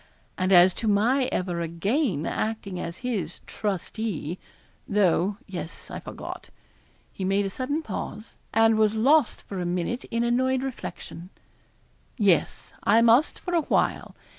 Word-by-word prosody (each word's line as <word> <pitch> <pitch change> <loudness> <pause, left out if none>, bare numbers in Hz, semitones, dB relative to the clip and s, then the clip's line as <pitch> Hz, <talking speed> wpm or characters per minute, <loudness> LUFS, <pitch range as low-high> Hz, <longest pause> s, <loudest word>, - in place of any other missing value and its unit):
And 185 0 0
as 180 0 +7
to 225 - -1
my 235 +6 +3
ever 175 -2 -1
again 170 - 0
acting 210 -4 -3
as 170 0 -5
his 190 -10 -2
trustee; 195 -4 -3 0.5
though, 200 -1 +2
yes, 175 -4 -7
I - - -5
forgot' - - -8 0.6
he 190 - -6
made 195 +2 +1
a 195 - -3
sudden 285 +8 -2
pause, 215 -1 -6 0.2
and 225 0 +4
was 215 0 +3
lost 270 +4 +3
for 195 -2 -5
a - - -2
minute 180 +8 -2
in 230 +1 -1
annoyed 260 +2 +1
reflection 210 -8 -7 0.9
'yes, 195 - +1
I 225 +3 +4
must 235 +7 +4
for 355 - -5
a 335 - +4
while. - - 0
210 Hz, 140 wpm, -26 LUFS, 185-235 Hz, 0.9 s, as